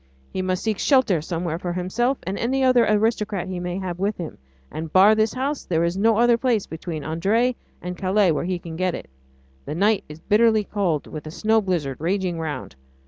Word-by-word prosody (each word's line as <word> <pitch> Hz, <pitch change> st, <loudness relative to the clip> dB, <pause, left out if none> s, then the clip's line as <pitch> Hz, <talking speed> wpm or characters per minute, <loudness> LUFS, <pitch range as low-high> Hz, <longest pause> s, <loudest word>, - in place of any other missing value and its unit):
He 185 Hz, -, -1 dB
must 185 Hz, -1 st, -1 dB
seek 215 Hz, -3 st, -1 dB
shelter 255 Hz, -, +3 dB
somewhere 165 Hz, 0 st, -3 dB
for 175 Hz, -1 st, -3 dB
himself 230 Hz, +9 st, 0 dB
and 190 Hz, -, -3 dB
any 265 Hz, +5 st, 0 dB
other 255 Hz, -2 st, +4 dB
aristocrat 210 Hz, -3 st, +1 dB
he 185 Hz, -1 st, -4 dB
may 180 Hz, 0 st, -3 dB
have 180 Hz, -2 st, -4 dB
with 200 Hz, +2 st, -1 dB
him, 165 Hz, -, -7 dB, 0.3 s
and, 160 Hz, 0 st, -5 dB
bar 195 Hz, +5 st, +7 dB
this 220 Hz, +1 st, +1 dB
house, 275 Hz, +3 st, -2 dB
there 165 Hz, -1 st, 0 dB
is 170 Hz, +1 st, 0 dB
no 215 Hz, +2 st, +3 dB
other 235 Hz, 0 st, +4 dB
place 235 Hz, -5 st, +1 dB
between 160 Hz, -1 st, -6 dB
Ardres 200 Hz, -, +1 dB, 0.3 s
and 180 Hz, 0 st, -4 dB
Calais 190 Hz, 0 st, +2 dB
where 155 Hz, -, -1 dB
he 185 Hz, 0 st, -1 dB
can 170 Hz, -2 st, -8 dB
get 185 Hz, +1 st, 0 dB
it. -, -, -9 dB, 0.5 s
The -, -, -4 dB
night 205 Hz, +3 st, +2 dB
is 150 Hz, +1 st, -10 dB
bitterly 220 Hz, +3 st, +3 dB
cold, 185 Hz, -8 st, -1 dB
with 155 Hz, -1 st, -8 dB
a -, -, -5 dB
snow 220 Hz, +6 st, +2 dB
blizzard 165 Hz, -9 st, -2 dB
raging 180 Hz, +1 st, -1 dB
round. 145 Hz, -, -5 dB
185 Hz, 205 wpm, -23 LUFS, 170-220 Hz, 0.5 s, bar